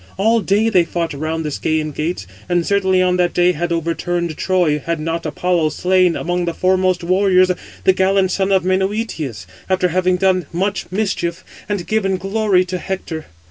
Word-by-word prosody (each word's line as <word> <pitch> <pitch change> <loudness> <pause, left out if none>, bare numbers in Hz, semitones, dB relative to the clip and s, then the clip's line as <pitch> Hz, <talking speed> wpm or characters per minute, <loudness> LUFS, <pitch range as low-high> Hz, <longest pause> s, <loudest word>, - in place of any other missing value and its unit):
All 225 +4 +3
day 205 +3 +2
they 190 -6 +4
fought 170 -1 -3
round 160 +2 -3
the - - -1
Scæan 155 +1 -1
gates, 155 - -3 0.2
and 175 -1 +1
certainly 190 -2 +2
on 180 0 +2
that 175 -1 +1
day 175 0 +4
had 175 +1 -3
overturned 170 0 -2
Troy, 175 -5 +1
had 170 -1 -2
not 165 +2 -3
Apollo 175 -3 0
slain, 180 +1 +2
among 175 0 -1
the 170 -1 -3
foremost 185 -1 +1
warriors, 185 0 +3 0.3
the 190 - +5
gallant 190 0 +2
son 195 +1 0
of 190 -2 +3
Menœtius, 185 - -2 0.2
after 185 -1 +2
having 185 +1 +1
done 185 -3 +1
much 195 +2 -2
mischief, 185 -4 -2 0.3
and 200 -4 -2
given 195 -3 0
glory 195 -1 +1
to 180 0 -4
Hector. 170 -5 -5
180 Hz, 175 wpm, -18 LUFS, 170-190 Hz, 0.3 s, the